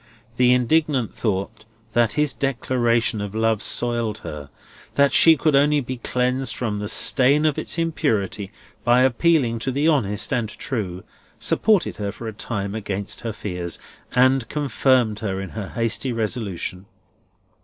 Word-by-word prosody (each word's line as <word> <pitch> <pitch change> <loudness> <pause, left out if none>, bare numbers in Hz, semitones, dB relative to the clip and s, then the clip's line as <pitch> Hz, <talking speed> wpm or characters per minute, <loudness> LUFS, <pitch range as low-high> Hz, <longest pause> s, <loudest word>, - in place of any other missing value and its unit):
The 125 0 +5
indignant 130 0 +2
thought 105 0 -3 0.3
that 120 -2 +2
his 150 -1 +1
declaration 120 -4 0
of 105 0 -6
love 110 -1 +1
soiled 120 -3 -1
her; 75 -2 -7 0.5
that 140 -1 +4
she 165 -1 +7
could 155 +1 +2
only 145 +1 +4
be 130 -1 -5
cleansed 125 0 -1
from 110 -4 -2
the 105 - -4
stain 140 +7 +4
of 155 -2 +1
its - - -4
impurity 105 - -1 0.3
by 120 +1 +4
appealing 130 -2 +2
to 130 +4 -2
the 140 +4 +1
honest 110 -8 0
and 120 -4 -1
true; 100 -7 -4 0.3
supported 210 -5 +1
her 100 -1 -3
for 115 +2 -8
a 110 - -5
time 100 -2 -4
against 100 -2 -4
her 115 - -3
fears, 90 -5 -5 0.3
and 130 -1 +3
confirmed 130 -6 +1
her 95 -3 -3
in 95 -1 -5
her 105 0 -6
hasty 115 +2 -1
resolution. 105 -5 -3
115 Hz, 150 wpm, -22 LUFS, 105-135 Hz, 0.5 s, she